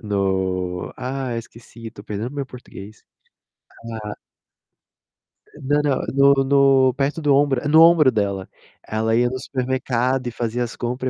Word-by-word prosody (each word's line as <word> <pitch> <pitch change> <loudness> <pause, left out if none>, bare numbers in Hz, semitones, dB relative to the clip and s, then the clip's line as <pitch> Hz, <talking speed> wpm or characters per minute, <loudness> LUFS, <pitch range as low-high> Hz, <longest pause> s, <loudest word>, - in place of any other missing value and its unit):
no 95 -3 -2
ah, 130 -1 -4
esqueci, 115 0 -10
tô 100 - -13
perdendo 110 +5 -5
meu 140 -2 -4
português. 110 -5 -12 0.8
Hã. 110 -2 -6 1.5
Não, 145 +2 +1
não, 145 -2 0 0.3
no 135 -1 +1
no 135 -1 +4
perto 145 +3 -1
do 145 -2 +3
ombro, 140 -1 +1
no 160 +1 +6
ombro 165 -5 +6
dela. 100 -4 -2 0.4
Ela 110 +1 0
ia 120 +1 +2
no 130 +1 -5
supermercado 130 -1 -1
e - - -3
fazia 120 +1 -2
as 120 - -6
compra 125 +2 -3
125 Hz, 140 wpm, -21 LUFS, 110-135 Hz, 1.5 s, no